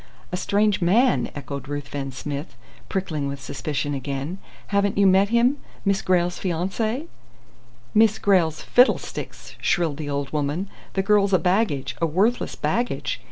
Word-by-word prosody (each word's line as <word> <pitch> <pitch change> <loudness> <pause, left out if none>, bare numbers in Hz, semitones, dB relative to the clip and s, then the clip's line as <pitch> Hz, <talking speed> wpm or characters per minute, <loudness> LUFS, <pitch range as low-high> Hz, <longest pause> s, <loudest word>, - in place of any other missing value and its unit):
"A - - -1
strange 205 +2 +1
man!" 230 +9 +3
echoed 140 -2 -6
Ruthven 145 -1 -4
Smith, 140 +4 -6 0.3
prickling 160 -7 -2
with 140 0 -4
suspicion 140 +2 -3
again. 140 +6 -4 0.3
"Haven't 200 -1 +1
you 200 - +5
met 195 +1 +5
him, 240 +4 +3 0.3
Miss 195 -1 +2
Grayle's 180 -1 +1
fiancé?" 200 - -1 0.9
"Miss 220 0 +5
Grayle's 175 -6 +2
fiddlesticks!" 250 +2 +1
shrilled 165 -6 +1
the 150 -2 -5
old 140 0 -3
woman. 150 +6 -1 0.2
"The 195 - 0
girl's 200 -1 +3
a - - +7
baggage, 180 - 0
a 165 - +3
worthless 200 +10 +1
baggage! 240 +1 -1
180 Hz, 140 wpm, -24 LUFS, 145-200 Hz, 0.9 s, a